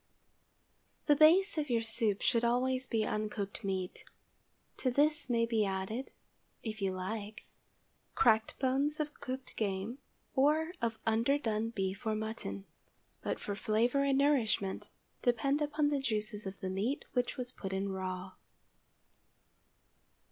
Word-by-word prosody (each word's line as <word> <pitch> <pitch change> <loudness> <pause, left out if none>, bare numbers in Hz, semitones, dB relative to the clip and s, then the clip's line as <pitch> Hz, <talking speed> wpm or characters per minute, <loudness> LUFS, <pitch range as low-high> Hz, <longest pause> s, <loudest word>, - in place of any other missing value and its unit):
THE 295 - +5
base 330 +4 +6
of 295 -2 -2
your 230 -2 +2
soup 225 -2 +1
should 230 0 +3
always 255 +2 +2
be 220 -2 +1
uncooked 210 -1 -3
meat. 190 -2 -3 0.7
To 260 - +1
this 295 +3 +2
may 230 -1 +3
be 225 -2 +2
added, 195 +6 -2 0.5
if 215 -2 -5
you 195 -1 +1
like, 205 +3 -5 0.7
cracked 220 -1 +3
bones 275 +3 +1
of 300 -1 -2
cooked 260 -1 -6
game, 205 +4 -2 0.4
or 305 +4 +3
of 230 -1 0
underdone 225 -1 +1
beef 195 -2 -3
or 215 - +2
mutton; 215 - -4 0.6
but - - -2
for 205 - -4
flavor 230 +7 +2
and 275 -1 +3
nourishment, 245 -9 +1 0.3
depend 275 +4 +2
upon 295 0 +1
the 290 -1 +1
juices 215 -4 -2
of 190 - -7
the 190 - -2
meat 210 +9 -1
which 245 -2 0
was 250 -1 -3
put 195 -6 -6
in 195 +1 -1
raw. 185 0 -4
230 Hz, 135 wpm, -33 LUFS, 205-270 Hz, 0.7 s, base